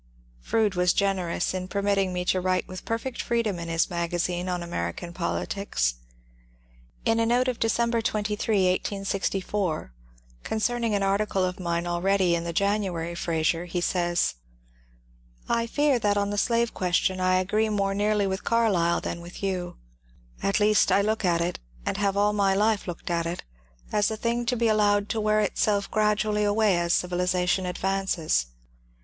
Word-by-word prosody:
Froude 210 - +1
was 180 -1 +2
generous 190 -4 0
in 185 -1 -3
permitting 200 -1 0
me 180 0 -2
to 185 0 +1
write 185 0 0
with 185 -2 -8
per 230 - 0
fect 255 +1 -5
freedom 225 -6 -1
in 170 - -5
his 165 0 +1
magazine 175 +1 -2
on 180 -1 -2
American 170 - -4
politics. 170 - -1 1.1
In 225 0 +2
a 230 - +3
note 245 +2 +2
of 250 -2 -2
December 235 +1 +1
23, 210 -2 0
1864, 195 - -2 0.5
concerning 230 0 0
an 200 - 0
article 195 -1 +1
of 180 0 -4
mine 170 -1 -1
already 180 +1 +2
in 170 0 -1
the 170 - -2
January 185 -3 -1
"Fnwer," 165 0 -1
he 175 +1 -2
says: 175 -1 +1 0.6
— - - -33
I 230 0 0
fear 290 0 +2
that 205 -2 +1
on 200 0 0
the - - -2
slave 235 0 +1
question 185 +1 0
I 185 0 +2
agree 210 +4 +1
more 200 -2 0
nearly 205 0 +1
with 190 0 -2
Carlyle 200 -8 +2
than 170 - -4
with 175 +3 -10
you. 185 -2 -2 0.6
At 195 +2 +1
least 210 0 +4
I 200 - +4
look 220 +1 0
at 170 -2 +2
it, 175 +1 -2 0.3
and - - -1
have 200 -1 0
all 205 +1 +3
my 195 -2 +2
life 210 0 +1
looked 175 0 -5
at 170 -1 0
it, 170 +1 -4 0.5
as 210 -1 +2
a 220 - -4
thing 235 +2 -1
to 250 - +2
be 235 -1 +1
allowed 205 -1 +2
to 220 - -1
wear 215 0 +2
itself 205 0 0
gradu 215 0 +2
ally 210 0 0
away 205 -3 +3
as 170 0 0
civilization 180 +1 +1
advances. 180 - 0
195 Hz, 170 wpm, -26 LUFS, 175-210 Hz, 1.1 s, least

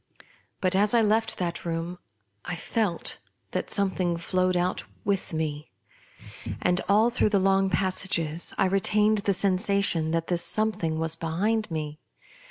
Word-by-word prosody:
But, 185 -1 +1
as 205 +4 +3
I 235 - +5
left 220 +1 +1
that 175 -2 -3
room 170 +1 -4 0.4
I 180 - -4
felt 180 0 -2 0.3
that - - -3
something 190 -4 0
flowed 185 +1 0
out 180 +1 -1 0.2
with 200 -2 -1
me; 155 -2 -3 0.9
and, 180 0 +1
all 215 +4 +4
through 240 -3 +2
the 205 - +2
long 195 0 +2
passages, 180 -4 +1
I - - +3
retained 210 +3 +2
the 200 0 0
sen 185 0 +2
sation 195 -5 +2
that 165 0 0
this 175 -1 0
something 210 -7 0
was 160 0 0
behind 200 +7 -1
me. 155 -2 -5
185 Hz, 150 wpm, -26 LUFS, 165-200 Hz, 0.9 s, I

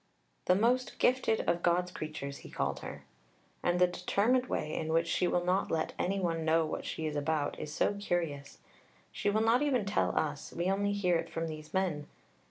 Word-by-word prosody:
"The 180 - +5
most 245 +5 +1
gifted 250 -3 +2
of 170 0 0
God's 180 +1 +2
creatures," 150 -4 -5
he - - -12
called - - -2
her. - - -8 0.6
And 175 0 +1
the 180 - +7
determined 210 +8 +1
way 155 - -2
in 160 0 -2
which 165 +1 +3
she 180 - +1
will 175 0 +1
not 185 +2 +1
let 160 -1 -1
any 195 +2 0
one 165 -3 -1
know 160 0 +3
what 155 - -4
she 160 - -4
is 155 -1 -2
about 150 0 -1
is 150 - -5
so 160 - +1
curious. 170 -8 -3 0.5
She 205 - -1
will 215 +2 +2
not 230 +3 +4
even 265 -8 +1
tell 200 +1 0
us; 150 -2 -2
we 175 +2 0
only 200 +1 +1
hear 180 -4 +2
it - - -4
from 165 0 -3
these 155 -1 -7
men. 175 -6 -1
175 Hz, 200 wpm, -32 LUFS, 160-200 Hz, 0.6 s, the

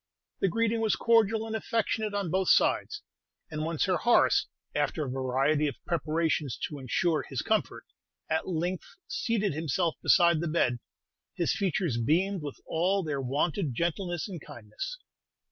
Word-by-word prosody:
The - - +2
greeting 230 +4 +1
was 220 -1 +2
cordial 225 -1 +3
and 220 0 -4
affectionate 220 -1 -1
on 195 -5 -1
both 190 0 +1
sides; 425 -1 +2 0.5
and 155 0 -3
when 165 0 -2
Sir 185 +3 +2
Horace, 240 - +4 0.3
after 155 -4 0
a - - -4
variety 135 +4 +1
of 140 - -3
preparations 155 -4 0
to 150 - -8
ensure 155 +5 +1
his 130 -5 -4
comfort, - - -1 0.4
at 160 - -1
length 175 +1 -3
seated 225 - 0
himself 160 +2 0
beside 170 -3 +5
the 170 - -2
bed, 130 -7 +1 0.6
his 170 - +1
features 175 - 0
beamed 180 - +1
with 145 -2 -7
all 185 +4 +1
their 145 -4 -2
wonted 145 - -1
gentleness 175 - -1
and 180 -6 -7
kindness. 110 - -7
170 Hz, 150 wpm, -29 LUFS, 150-200 Hz, 0.6 s, beside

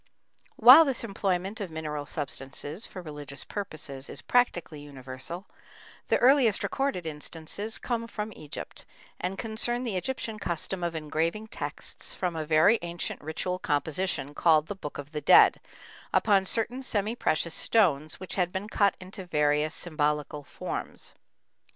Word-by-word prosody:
While 255 +8 +10
this 270 -6 0
employment 195 -1 -1
of 195 - -3
mineral 150 -2 -4
substances 145 - -4
for 185 - -9
religious 145 -3 -7
purposes 145 -9 -6
is - - -7
practically 175 -11 +1
universal, 140 +5 -8 0.6
the - - +3
earliest 255 -5 +4
recorded 270 -11 -1
instances 160 +7 -4
come 230 -2 -2
from 215 -1 -5
Egypt, 150 -1 -8 0.4
and 185 +2 -3
concern 235 +3 -1
the 230 -6 -2
Egyptian 225 0 -3
custom 175 +1 -2
of 170 -1 -1
engraving 165 +7 -2
texts - - -5
from 180 -3 -2
a 155 -1 -3
very 165 +9 +5
ancient 170 0 -4
ritual 170 +4 -3
composition, 145 0 -1
called 155 -1 +4
the 200 - -5
Book 150 -6 -7
of 145 +1 -8
the 150 -1 -4
Dead, - - +7 0.5
upon 195 -3 +3
certain 235 +5 +1
semi 215 -4 -1
precious 165 -6 0
stones 155 -9 +2
which 185 - -6
had 180 -2 0
been 195 +3 -4
cut 200 -2 +2
into 185 0 -8
various 150 -1 +2
symbolical 150 -3 -1
forms. - - -5
175 Hz, 145 wpm, -28 LUFS, 150-210 Hz, 0.6 s, While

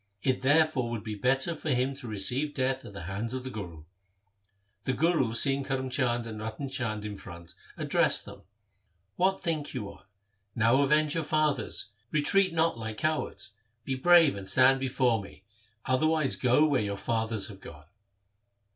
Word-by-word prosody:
It 130 -1 0
therefore 145 -2 +3
would 115 -3 -4
be 110 -1 -5
better 135 - +1
for 155 0 -5
him 130 0 +1
to 135 -3 -7
receive 125 +8 0
death 130 0 0
at 100 - -10
the 100 - -8
hands 100 +8 -4
of 130 - -4
the 130 - -6
Guru. 85 -9 -8 1.0
The 130 - 0
Guru 135 -5 +1
seeing 135 +2 +3
Karm 135 -1 -3
Chand 120 -3 0
and 110 -2 -7
Ratan 110 +6 -5
Chand 115 -5 -3
in 105 -1 -5
front 85 -2 -11 0.2
addressed - - +2
them, - - -11 0.4
' - - -48 0.3
What 190 +1 +1
think 160 -4 -2
you 100 - -4
on? - - -18 0.5
Now 115 +4 +3
avenge 150 +1 +3
your 165 - -1
fathers. 150 -7 -1 0.2
Retreat 185 +7 +2
not 165 -6 +1
like 110 -1 -5
cowards. 155 -8 -2 0.3
Be 135 - -2
brave 165 +2 +5
and 95 -1 -6
stand 135 +1 +5
before 125 -4 +1
me; 100 -1 -13 0.4
otherwise 155 +2 +2
go 130 +4 +3
where 140 -5 +2
your 100 -1 -3
fathers 110 -1 -1
have 95 -2 -11
gone.' 75 -6 -12
130 Hz, 175 wpm, -28 LUFS, 110-150 Hz, 1.0 s, brave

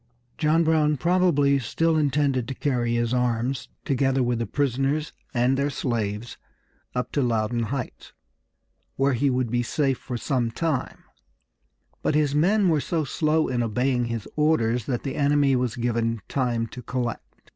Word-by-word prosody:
John 160 +2 +3
Brown 155 -2 +2
probably 155 -4 +3
still 165 +7 0
intended 140 -4 +1
to 135 - -4
carry 120 -4 0
his 120 0 0
arms, 125 +1 -1 0.2
together 135 -1 +1
with 120 -1 0
the 115 - -2
prisoners 140 +4 0 0.2
and 125 +1 +2
their 140 +2 0
slaves, 115 -4 -3 0.6
up 125 - -2
to 145 - 0
Loudoun 115 -1 0
Heights, 125 +2 -5 0.8
where 135 0 +2
he 135 +3 +2
would 125 -3 0
be 120 0 +1
safe 135 +2 0
for 125 -2 -5
some 120 -1 0
time, 140 +1 -2 1.0
but 155 - 0
his 150 -2 +2
men 190 +7 +3
were 155 -4 +2
so 165 0 -1
slow 155 +1 +1
in 125 -2 -1
obeying 125 +2 0
his 115 -3 -4
orders 125 -7 +1
that 125 -3 -2
the 135 - -3
enemy 145 -1 +3
was 125 -2 -1
given 115 -2 -1
time 120 -4 0
to 125 - -9
collect. 120 -1 -4
130 Hz, 155 wpm, -25 LUFS, 120-145 Hz, 1.0 s, John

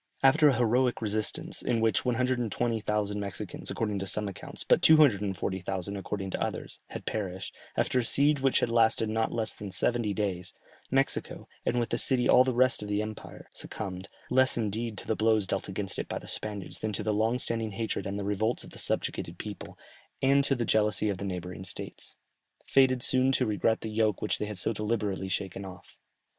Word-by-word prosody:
After 150 +3 +6
a 140 - +4
heroic 120 +2 +2
resistance, 110 -1 -2
in 115 - 0
which 110 -3 +2
120,000 115 -4 0
Mexicans 100 -1 -4
according 105 -3 -1
to 95 - -4
some 105 +2 +1
accounts, 100 - -6
but - - +4
240,000 100 - +3
according 95 0 -4
to - - -3
others, - - -4
had - - -8
perished, 95 -3 -4 0.2
after 130 - +2
a - - +1
siege 140 +4 +3
which 135 -1 +3
had - - +1
lasted 115 -1 +3
not 110 +1 0
less 110 -2 -1
than 105 - -7
seventy 115 +3 +1
days, 95 -3 -3 0.3
Mexico, 135 +1 -1 0.2
and 120 - +2
with 120 - -1
the 120 - +1
city 125 -2 +3
all 125 - +7
the 130 - 0
rest 130 -2 +3
of 105 - -5
the 105 +1 0
empire, 110 0 -8
succumbed, 95 +1 -6 0.2
less 130 0 +4
indeed 110 0 -2
to - - -7
the 110 - 0
blows 110 -2 +3
dealt 95 +1 -2
against 95 0 -1
it - - -3
by - - -2
the - - -9
Spaniards 105 -3 -4
than 110 -1 -2
to - - -2
the 110 - 0
long 110 +3 +2
standing 115 -3 -2
hatred 110 -2 -3
and 100 +1 -3
the 100 - -3
revolts 105 +4 0
of - - -12
the - - -10
subjugated 85 +1 -2
people, 105 0 -8 0.4
and 140 +1 +4
to 135 - +2
the 120 -2 -1
jealousy 105 0 +2
of 95 -2 -2
the 100 - -4
neighbouring 90 -1 -5
states, 95 - -6 0.5
fated 130 -2 +4
soon 130 0 +3
to 130 -1 +3
regret 110 +1 +1
the - - -4
yoke 110 -2 +1
which 105 - -1
they - - -1
had 105 -2 -5
so 95 - 0
deliberately 105 -3 -2
shaken 95 0 -3
off. 95 -2 -11
110 Hz, 200 wpm, -29 LUFS, 100-120 Hz, 0.5 s, all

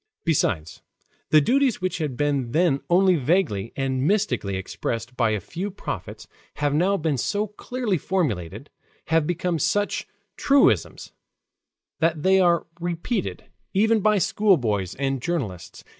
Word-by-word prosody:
Besides, 95 - 0 0.5
the 155 - +6
duties 260 - +2
which 185 -1 -2
had 145 -6 -3
then 140 -4 0
been 155 0 +2
only 185 0 +4
vaguely 135 - 0
and 135 -1 -1
mystically 195 - 0
expressed 115 +5 -4
by 120 -3 +2
a 110 -1 0
few 175 - -5
prophets 200 - -7 0.3
have 145 -1 0
now 185 +6 +2
been 155 -6 -1
so 205 - 0
clearly 215 -1 -3
formulated, 120 - -2 0.4
have 160 -2 +2
become 175 -1 -1
such 205 +8 0 0.3
truisms, 280 0 +2 0.9
that 160 -2 +1
they 190 0 +5
are 175 -2 +3
repeated 175 +5 -3 0.3
even 220 +3 +3
by 215 +1 +3
schoolboys 120 - +1
and 135 -1 -2
journalists. 120 - -4
165 Hz, 130 wpm, -24 LUFS, 130-190 Hz, 0.9 s, the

